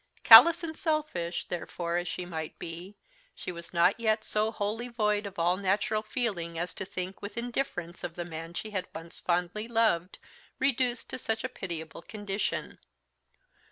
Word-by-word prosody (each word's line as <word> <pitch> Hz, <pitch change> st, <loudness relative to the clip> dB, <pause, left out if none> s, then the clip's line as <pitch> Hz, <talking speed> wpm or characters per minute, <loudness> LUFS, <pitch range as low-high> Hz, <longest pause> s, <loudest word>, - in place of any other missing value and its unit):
Callous 330 Hz, +10 st, +10 dB
and 320 Hz, -1 st, -4 dB
selfish, 300 Hz, -, -1 dB
therefore, 170 Hz, 0 st, -3 dB
as 175 Hz, 0 st, -2 dB
she 180 Hz, -, -4 dB
might 160 Hz, -3 st, -5 dB
be, 175 Hz, +5 st, -8 dB, 0.4 s
she -, -, -5 dB
was 170 Hz, -1 st, -9 dB
not 175 Hz, +5 st, +3 dB
yet 220 Hz, -1 st, +1 dB
so 215 Hz, +1 st, 0 dB
wholly 220 Hz, +3 st, -2 dB
void 210 Hz, -3 st, 0 dB
of 200 Hz, -, -10 dB
all 175 Hz, +2 st, +2 dB
natural 200 Hz, +2 st, +1 dB
feeling 205 Hz, -8 st, -2 dB
as 175 Hz, 0 st, -2 dB
to 190 Hz, -, -5 dB
think 185 Hz, +1 st, -5 dB
with 205 Hz, +3 st, -7 dB
indifference 235 Hz, -8 st, -3 dB
of 170 Hz, -1 st, -4 dB
the 175 Hz, -, -4 dB
man 165 Hz, 0 st, -7 dB
she 215 Hz, -, -5 dB
had 185 Hz, -3 st, -2 dB
once 165 Hz, +1 st, -7 dB
fondly 180 Hz, +5 st, -1 dB
loved 220 Hz, -7 st, +2 dB, 0.4 s
reduced 255 Hz, -2 st, +1 dB
to -, -, -4 dB
such 225 Hz, -2 st, -2 dB
a 255 Hz, -, -2 dB
pitiable 170 Hz, -9 st, -6 dB
condition. 205 Hz, +1 st, -3 dB
195 Hz, 165 wpm, -29 LUFS, 175-225 Hz, 0.4 s, Callous